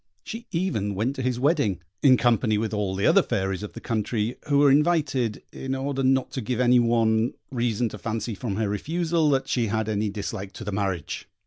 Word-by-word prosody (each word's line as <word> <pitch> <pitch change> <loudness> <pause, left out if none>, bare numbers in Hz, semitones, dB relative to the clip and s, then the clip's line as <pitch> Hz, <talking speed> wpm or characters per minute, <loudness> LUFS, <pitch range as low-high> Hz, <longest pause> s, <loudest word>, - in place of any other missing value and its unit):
She 230 +1 -7
even 165 - -1
went 120 +8 -1
to - - -2
his 125 -1 -1
wedding, 135 - +2 0.2
in 130 -3 +6
company 115 -2 +2
with 110 0 -2
all 100 -3 -1
the 100 - 0
other - - +6
fairies 95 0 -2
of 105 - -7
the - - -7
country, 110 +1 -1
who 140 - +4
were 140 -1 +6
invited, 145 -7 +1
in 135 0 -3
order 135 0 -2
not 130 0 +2
to 130 - -3
give 120 +2 -2
any 125 0 +5
one 115 -1 +2 0.2
reason 120 -2 0
to - - -9
fancy 115 0 -3
from 105 0 -4
her 110 0 0
refusal 160 - 0
that 135 -2 +1
she 120 -3 0
had 110 +1 -1
any 105 0 0
dislike 100 -1 -5
to - - -8
the 105 - -4
marriage. 95 -6 -3
115 Hz, 210 wpm, -25 LUFS, 105-135 Hz, 0.2 s, in